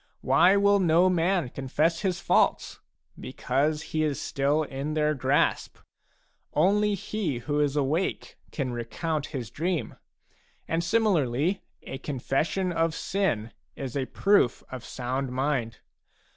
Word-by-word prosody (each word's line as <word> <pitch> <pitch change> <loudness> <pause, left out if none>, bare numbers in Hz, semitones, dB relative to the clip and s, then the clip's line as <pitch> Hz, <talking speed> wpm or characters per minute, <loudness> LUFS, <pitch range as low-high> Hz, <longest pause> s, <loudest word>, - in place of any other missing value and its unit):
Why 185 +3 +5
will 200 0 +4
no 175 +1 +4
man 175 -3 +1
confess 150 +6 0
his 185 -3 -1
faults? - - +1 0.4
Because 145 +4 -1
he 155 - +1
is 150 -3 -1
still 145 +3 0
in 140 +2 -4
their 150 0 +2
grasp; 135 +1 0 0.8
only 205 +2 +3
he 190 - -3
who 145 +5 -2
is 145 -1 +1
awake 150 +6 -1 0.2
can 130 -4 -3
recount 145 +6 -3
his 125 -7 -6
dream, 170 +4 -2 0.7
and 165 +1 0
similarly 175 - +1 0.2
a 135 - -7
confession 150 +7 -1
of 165 -1 0
sin 120 - -1 0.2
is 135 -2 -6
a 135 -2 -1
proof 200 - +2
of 130 -2 -7
sound 130 +2 -3
mind. 130 -4 -1
150 Hz, 130 wpm, -27 LUFS, 135-175 Hz, 0.8 s, Why